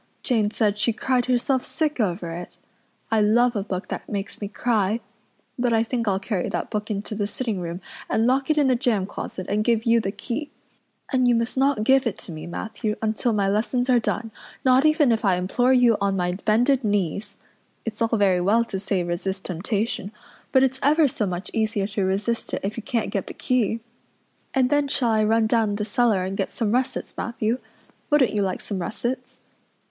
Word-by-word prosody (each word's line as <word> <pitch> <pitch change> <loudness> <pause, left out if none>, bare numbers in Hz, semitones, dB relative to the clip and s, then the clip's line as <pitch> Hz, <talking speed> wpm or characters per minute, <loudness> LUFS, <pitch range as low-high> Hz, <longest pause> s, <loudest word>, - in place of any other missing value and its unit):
Jane 220 -5 +2
said 210 -1 0
she 220 +2 +2
cried 250 +1 0
herself 255 +1 +1
sick 300 -4 0
over 175 -5 -1
it. 175 +2 -8 0.5
I 220 -1 +3
love 235 +3 +3
a 205 - 0
book 190 -1 -5
that - - -5
makes 200 0 -4
me 205 - -2
cry. 215 0 0 0.6
But 245 -1 +2
I 225 0 +3
think 230 -1 -2
I'll 195 -2 +2
carry 195 -2 -2
that - - -3
book 210 0 -3
into 210 +1 -3
the 205 -1 -1
sitting 220 -2 -3
room 170 +1 -5 0.3
and 225 - +2
lock 265 +3 +2
it 310 - +2
in 295 - +4
the 255 - +4
jam 235 -6 +1
closet 190 -1 -6
and 210 +2 +1
give 230 -1 +1
you 230 0 +4
the 195 -3 -2
key. 260 +7 -4 0.6
And 255 -1 +3
you 240 - +4
must 230 +1 -1
not 270 -4 +2
give 265 +2 +4
it 210 - -2
to - - -8
me, 155 0 -7
Matthew, 215 +4 -3
until 220 +2 0
my 205 -3 +1
lessons 245 +5 +1
are 245 - +5
done, 225 0 -2 0.3
not 260 +2 +5
even 305 -4 +4
if 225 -1 +1
I 195 -3 +3
implore 195 +8 +1
you 245 -4 +5
on 200 -1 +1
my 180 -1 0
bended 235 +8 +2
knees. 205 -2 -1 0.5
It's 225 -1 -5
all 230 0 +2
very 190 -3 +3
well 215 +6 +3
to 200 -4 -4
say 190 -2 0
resist 185 +2 -3
temptation, 200 +4 -2 0.4
but 260 - +5
it's 260 0 +1
ever 300 +2 +4
so 220 -5 -2
much 180 +1 -4
easier 215 -3 0
to 200 -1 -1
resist 205 +5 0
it - - -5
if 200 +2 -2
you 230 - -4
can't 230 -1 -2
get 195 - -2
the - - -8
key. 230 -3 0 0.7
And 260 -1 +3
then 290 -1 +3
shall 245 -4 +1
I 215 -1 +3
run 220 +1 +3
down 220 -2 +2
the 210 0 -2
cellar 220 -3 +2
and 190 +1 -3
get 195 - -1
some 220 -3 -1
russets, 255 +2 -1
Matthew? 230 +1 -1 0.5
Wouldn't 295 -7 +4
you 210 - +1
like 190 -2 -1
some 200 -3 -4
russets?" 235 +7 -4
220 Hz, 210 wpm, -24 LUFS, 200-245 Hz, 0.7 s, are